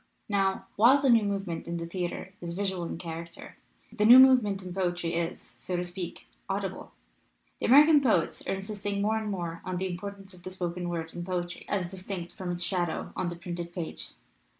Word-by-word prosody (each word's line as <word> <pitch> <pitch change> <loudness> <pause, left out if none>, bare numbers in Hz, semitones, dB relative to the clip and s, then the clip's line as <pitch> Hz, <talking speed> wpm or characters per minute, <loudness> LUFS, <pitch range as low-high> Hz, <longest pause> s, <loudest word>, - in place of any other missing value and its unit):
"Now, 195 -2 +1
while 245 +7 +7
the 270 -2 +4
new 230 -1 +6
movement 195 -5 -3
in 170 0 -2
the 170 - -4
theater 180 +2 -4
is 170 -1 -4
visual 190 -2 -1
in - - -5
character, 170 0 -8 0.4
the 210 - 0
new 235 +4 +10
movement 245 -7 +6
in 180 -1 -6
poetry 175 -2 -1
is, 170 0 -1
so 180 - -6
to 175 - 0
speak, 175 - -6 0.2
audible. - - -3 0.7
The - - 0
American 295 +4 +8
poets 215 -11 +1
are - - 0
insisting 200 0 -4
more 220 +1 +2
and 215 -1 -4
more 170 -4 -4
on 185 -1 -3
the 190 +1 -1
importance 195 +2 -6
of 180 - -13
the 185 - -7
spoken 180 -1 -3
word 165 -1 -4
in 175 - -5
poetry, 175 -1 -4
as 185 -3 -1
distinct 185 -2 -6
from 180 -2 -4
its 175 0 -1
shadow 175 -3 -1
on 175 - -1
the 175 - -5
printed 170 0 -6
page. 170 -3 -5
185 Hz, 195 wpm, -29 LUFS, 175-200 Hz, 0.7 s, new